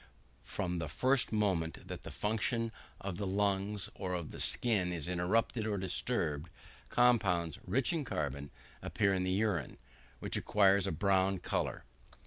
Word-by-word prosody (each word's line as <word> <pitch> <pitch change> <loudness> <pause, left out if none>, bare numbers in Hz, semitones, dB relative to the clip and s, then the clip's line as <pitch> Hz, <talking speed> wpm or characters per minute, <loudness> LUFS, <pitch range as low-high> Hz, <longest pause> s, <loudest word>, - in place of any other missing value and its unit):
From 90 -3 -3
the 80 -2 -3
first 130 - +2
moment 95 -7 0
that - - -6
the - - -8
function 115 +2 0 0.3
of 95 -3 -4
the 100 - -2
lungs 100 0 0
or 90 -2 -3
of 85 -3 -4
the - - -9
skin 100 -7 +1
is 85 -2 -3
interrupted 100 +6 +1
or 105 -2 0
disturbed, 80 -4 -1 0.4
compounds, 95 -10 +3
rich 120 - +2
in 160 -3 0
carbon, 70 - -3 0.3
appear 100 -2 +1
in 95 -1 0
the 95 - -1
urine, 95 - 0 0.4
which - - -3
acquires 100 -1 +3
a - - 0
brown 95 +3 +2
colour. 90 - -2
95 Hz, 150 wpm, -33 LUFS, 90-105 Hz, 0.4 s, compounds